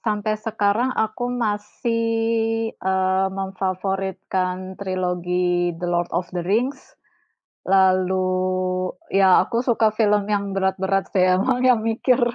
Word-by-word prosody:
sampai 215 -1 -1
sekarang 215 +2 0
aku 220 +3 -1
masih, 230 0 -2 0.7
eee, 190 0 0
memfavoritkan 190 -1 -3
trilogi 180 -2 -1
The 175 - -6
Lord 175 0 0
of 175 +1 -3
the 180 - -2
Rings. 240 +10 0 0.8
Lalu, 190 -1 +3 1.0
ya, 190 -2 +6
aku 235 0 -1
suka 225 -3 +2
film 210 -2 +2
yang 200 -1 -1
berat-berat 190 0 0
sih, 185 - +4
emang 195 +8 +2
yang 250 -3 +5
mikir. 225 +4 +1
195 Hz, 110 wpm, -22 LUFS, 185-220 Hz, 1.0 s, ya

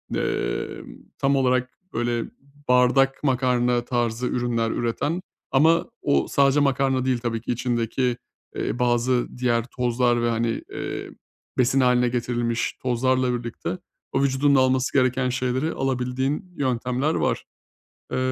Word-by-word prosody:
emm, - - -3 0.2
tam 140 0 +2
olarak, 130 -1 +2 0.2
böyle, 120 0 -1 0.4
bardak 130 +2 +3
makarna 125 -3 +1
tarzı 120 0 -1
ürünler 120 -2 0
üreten. 145 +9 -1 0.3
Ama 160 +5 +4 0.2
o 140 - +2
sadece 140 +1 +3
makarna 135 -2 +1
değil 130 -1 +2
tabii 115 -1 -2
ki 120 - -3
içindeki, 120 +1 -1 0.4
eee, 120 - -2
bazı 120 0 +2
diğer 120 -2 +1
tozlar 120 -1 +2
ve, 120 - +2
hani, 115 0 -1
eee, - - -5 0.5
besin 130 +2 +3
hâline 125 -1 +3
getirilmiş 120 -1 -1
tozlarla 130 0 +1
birlikte, 120 +9 -5 0.4
o 135 - +2
vücudun 140 +1 +3
da - - +5
alması 130 0 +2
gereken 130 -1 +2
şeyleri 130 +4 -1
alabildiğin 135 +5 -2
yöntemler 130 +2 0
var. - - 0 0.7
Eee, - - -1
125 Hz, 130 wpm, -24 LUFS, 120-135 Hz, 0.7 s, da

